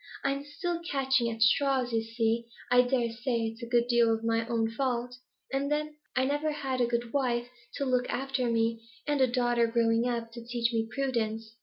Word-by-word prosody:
I'm 275 0 0
still 340 +4 -3
catching 265 -5 +1
at 225 -1 +1
straws, 255 +1 +3
you 225 - +2
see; 225 0 -1 0.2
I 250 0 +7
dare 245 -2 0
say 240 0 -1
it's 225 +1 -4
a 235 - -5
good 240 0 +2
deal 235 -2 +3
my 225 0 +1
own 225 -2 0
fault; 245 0 -1 0.4
and 280 +1 0
then 300 0 -1 0.2
I 260 +1 +3
never 290 +3 0
had 265 -3 -2
a 240 - +3
good 235 0 -2
wife 245 -4 0 0.3
to 280 - -1
look 250 -1 +1
after 265 -2 -1
me, 230 0 +1 0.2
and 290 -2 +1
a 260 - +6
daughter 240 -1 +2
growing 230 0 +2
up 235 -2 -2
to 235 0 -9
teach 235 0 -1
me 225 0 0
prudence. 225 -4 -2
240 Hz, 195 wpm, -29 LUFS, 230-265 Hz, 0.4 s, I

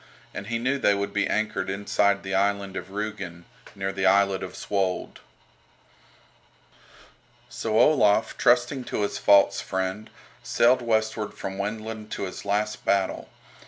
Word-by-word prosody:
And 100 - -6
he 115 0 -1
knew 130 +4 0
they 100 -5 +3
would 100 0 -3
be 105 - +1
anchored 110 -2 -1
inside 100 0 +1
the 95 0 -4
island 100 0 0
of - - -5
Rügen, 100 -4 -5 0.3
near 95 0 -2
the 95 0 +1
islet 100 0 +3
of - - -6
Svold. 95 -2 -2 2.3
So 110 -1 -1
Olaf, 110 -7 +4
trusting 125 +2 +2
to 105 - -2
his 100 - -2
false 100 0 +5
friend, 95 +3 -3 0.3
sailed 125 +2 +3
westward 110 -2 -1
from 95 0 -6
Wendland 110 +1 -5
to - - -4
his 95 +1 -6
last 105 +1 -1
battle. 95 -1 0
100 Hz, 140 wpm, -25 LUFS, 100-110 Hz, 2.3 s, false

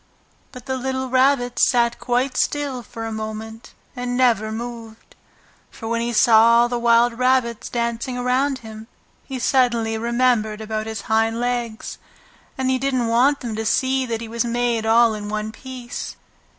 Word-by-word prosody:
But 250 -1 -11
the 260 -1 -2
little 260 0 -3
Rabbit 255 -2 +2
sat 235 -1 +3
quite 250 +2 0
still 285 -4 -1
for 225 -1 -8
a 225 - -4
moment 220 +1 -7 0.2
and 245 0 -3
never 225 -4 +2
moved. 230 -1 -8 0.6
For 225 - -9
when 230 0 -1
he 235 +1 -1
saw 230 +1 +6
all 240 - +2
the 240 -1 -2
wild 235 0 +3
rabbits 255 -3 +1
dancing 235 +1 -2
around 260 +3 +1
him 220 0 -10 0.4
he 270 - -5
suddenly 235 -3 +1
remembered 235 -2 +1
about 220 0 -4
his 220 -2 -5
hind 225 +1 +1
legs, 240 -2 -3 0.6
and 260 0 0
he 260 - +1
didn't 255 -3 0
want 265 +5 +3
them 235 -4 -4
to 220 - -3
see 260 +3 +1
that 230 -1 -3
he 230 - -6
was 230 +1 -1
made 235 -1 -1
all 230 0 +5
in 210 -1 -6
one 215 0 -3
piece. 250 +1 -7
235 Hz, 165 wpm, -21 LUFS, 225-255 Hz, 0.6 s, saw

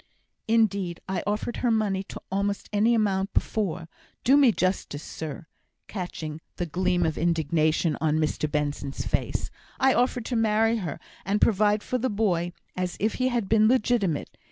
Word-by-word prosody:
"Indeed, 200 -6 +1
I 190 0 -1
offered 210 +3 -2
her 245 - +1
money 210 -4 +1
to - - -8
almost 200 +1 -1
any 220 +3 +4
amount 195 -3 0
before; 180 -6 -1 0.4
do 265 - +5
me 280 -4 +6
justice, 185 -6 -1
sir," 160 +2 -6 0.4
catching 160 -5 -5
the 175 - -2
gleam 180 +1 +1
of 160 -1 -1
indignation 160 -1 +1
on 155 -1 +2
Mr 155 -1 0
Benson's 145 -2 -2
face; - - -1 0.3
"I 265 0 +5
offered 245 -1 +1
to 250 - -2
marry 225 0 +3
her, 175 -9 -4 0.2
and 200 +2 0
provide 210 0 +3
for 255 - -1
the 260 +2 0
boy 180 -5 0 0.2
as 180 -1 -2
if 215 +1 +1
he 255 - +3
had 240 -5 0
been 215 0 +4
legitimate. 220 - +1
195 Hz, 160 wpm, -26 LUFS, 165-225 Hz, 0.4 s, me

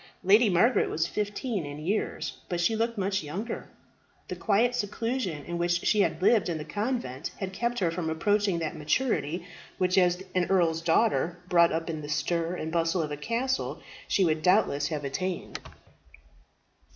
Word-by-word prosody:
Lady 210 +4 +6
Margaret 210 +8 +3
was 160 - 0
fifteen 205 +1 -2
in 145 0 -7
years; 180 +8 -2
but 175 -2 -1
she 200 +6 +2
looked 230 +1 -1
much 195 0 0
younger. 180 +10 -5 0.6
The - - -3
quiet 230 +3 +2
seclusion 210 - -2
in 170 0 -4
which 175 0 0
she 210 - +4
had 190 - 0
lived 205 -3 +4
in 165 - -1
the 150 - -6
convent 210 - -3
had 190 -1 -4
kept 235 +4 -1
her 175 -6 +1
from 165 -1 -3
approaching 200 +3 +1
that 160 -2 -3
maturity 165 - -1 0.3
which 185 0 +3
as 180 0 +2
an 180 -1 +2
earl's 170 -4 +2
daughter, 175 0 +2
brought 170 -1 +5
up 165 0 -2
in 160 -2 -4
the 145 - -7
stir 165 +4 -1
and 160 -2 -4
bustle 165 +1 +1
of 150 - -5
a - - -2
castle, 235 - -2 0.3
she 195 - +3
would 155 -1 +1
doubtless 170 -5 +3
have 150 -3 -3
attained. 180 +6 -3
180 Hz, 175 wpm, -28 LUFS, 165-210 Hz, 0.6 s, Lady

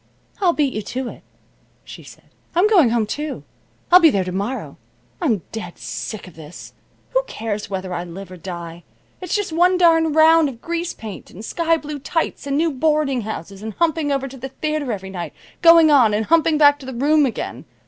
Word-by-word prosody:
"I'll 365 -3 +4
beat 290 -5 0
you 215 - -3
to 245 +4 -4
it," - - -12 0.6
she - - -11
said. - - -15 0.3
"I'm 360 +5 +4
going 360 - +5
home, 230 -1 +1
too. 295 +7 -5 0.5
I'll 360 - +9
be 330 -3 +7
there 195 -9 +1
to 180 - -5
morrow. 200 +8 -4 0.4
I'm 225 - 0
dead 180 -6 -7
sick 215 -3 -6
of 180 - -13
this. 155 +1 -11 0.4
Who - - +2
cares 215 -2 -4
whether 190 -2 -4
I 175 0 -3
live 180 +2 -9
or 185 - -9
die? 170 -1 -8 0.4
It's 365 - -2
just 410 -6 -2
one 360 +3 +4
darned 325 -3 +4
round 320 -1 +6
of 240 -4 -10
grease 340 +4 -3
paint, 215 -4 -9
and 210 +5 -10
sky 330 +3 +1
blue 300 -1 -7
tights, 285 +1 -2
and 280 0 0
new 325 +1 +2
boarding 295 -2 +1
houses 200 -2 -7
and 220 0 -6
humping 320 -3 0
over 275 -1 -1
to 270 0 -11
the 265 +2 -7
theater 305 -1 -3
every 190 -2 -5
night, 175 -2 -6 0.3
going 330 -2 +7
on, 240 -7 +5
and 215 +1 -1
humping 325 +1 +3
back 290 -1 +5
to 265 - -11
the 260 - -6
room 290 +3 +3
again. 240 - -5
275 Hz, 205 wpm, -20 LUFS, 210-320 Hz, 0.6 s, I'll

